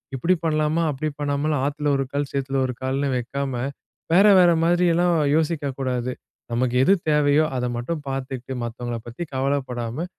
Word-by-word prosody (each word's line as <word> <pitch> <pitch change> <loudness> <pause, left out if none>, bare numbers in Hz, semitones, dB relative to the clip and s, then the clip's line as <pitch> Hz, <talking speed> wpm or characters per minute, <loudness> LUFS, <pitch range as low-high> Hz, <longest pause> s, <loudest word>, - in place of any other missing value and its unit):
இப்டி 165 +8 +2
பண்ணலாமா, 155 0 +1
அப்டி 145 +2 -3
பண்ணாமல், 145 +1 0
ஆத்துல 145 +1 -2
ஒரு 135 - 0
கால் 145 0 -1
சேத்துல 135 0 -2
ஒரு 130 - -3
கால்னு 135 +2 -1
வைக்காம, 135 +2 -3 0.6
வேற 190 +4 +6
வேற 175 -2 +6
மாரிலாம் 175 0 +3 0.2
யோசிக்கக்கூடாது. 135 -6 -1 0.4
நமக்கு 120 +1 0
எது 190 - +5 0.2
தேவையோ, 150 0 +4
அத 125 - -1
மட்டும் 145 +6 -4
பாத்துக்கிட்டு 130 -1 -4
மத்தவங்கள 120 0 -4
பத்தி 120 +8 -6
கவலைப்படாம, 130 0 -2
140 Hz, 140 wpm, -23 LUFS, 130-155 Hz, 0.6 s, வேற